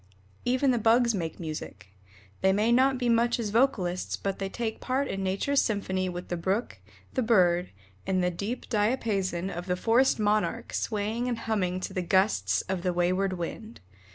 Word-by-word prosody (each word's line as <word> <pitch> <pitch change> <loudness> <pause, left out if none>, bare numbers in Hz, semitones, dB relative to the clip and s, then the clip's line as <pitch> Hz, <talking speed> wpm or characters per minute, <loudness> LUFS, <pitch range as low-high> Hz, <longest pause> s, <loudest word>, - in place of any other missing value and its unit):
Even 255 +2 +2
the 240 - +1
Bugs 235 +2 +4
make 165 -5 -4
music. 150 - -7 0.5
They 190 - +4
may 210 +4 +2
not 260 +2 +4
be 250 -1 -1
much 235 +1 +2
as 215 -3 -2
vocalists 205 -7 +1
but 195 -1 -3
they 195 -1 -2
take 225 +1 -4
part 265 +2 0
in 195 - -3
nature's 195 +9 +1
symphony 190 -4 -1
with 180 0 -7
the 175 - -1
brook, 190 +7 -2 0.3
the 260 - 0
Bird, 180 -6 +3 0.4
and 185 -1 +1
the 180 - +1
deep 205 +8 -5
diapason 205 -5 0
of 175 0 -6
the 180 - +1
forest 235 +7 +3
monarch 210 -4 0
swaying 220 +3 -1
and 240 -2 -1
humming 190 -5 -1
to - - -5
the 185 - -1
gusts 190 +4 +2
of 190 -2 -3
the 180 0 0
wayward 185 +2 +1
wind. 185 +6 -6
200 Hz, 180 wpm, -28 LUFS, 185-235 Hz, 0.5 s, Bugs